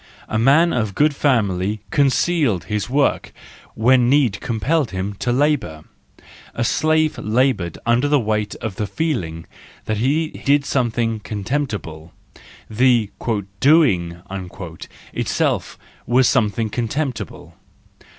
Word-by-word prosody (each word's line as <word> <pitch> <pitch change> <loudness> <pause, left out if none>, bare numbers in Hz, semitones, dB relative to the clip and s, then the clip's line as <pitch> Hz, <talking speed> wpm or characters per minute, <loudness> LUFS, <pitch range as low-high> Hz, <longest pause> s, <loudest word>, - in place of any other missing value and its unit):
A 110 - -1
man 145 +8 +4
of 110 -5 -1
good 150 0 +2
family 105 -7 +1
concealed 140 - +2
his 105 +1 -3
work 140 +2 +1 0.4
when 125 +2 +4
need 130 -7 +2
compelled 125 +5 0
him 95 +1 -4
to 120 - 0
labour. 125 - 0 0.7
The 120 - -1
slave 155 +5 +1
laboured 110 -6 0
under 120 +4 +2
the 145 0 +3
weight 105 -2 -1
of 110 -5 -6
the 105 - -2
feeling 95 - -3 0.4
that 110 - -1
he 150 +8 +1
did 140 -1 +1
something 115 -4 0
contemptible:— 105 - -4 0.6
the 115 -2 +2 0.5
"doing" 95 - +3 0.9
itself - - -1 0.3
was 125 +1 +4
something 110 -3 +1
contemptible. 125 +2 -4
120 Hz, 110 wpm, -20 LUFS, 105-140 Hz, 0.9 s, man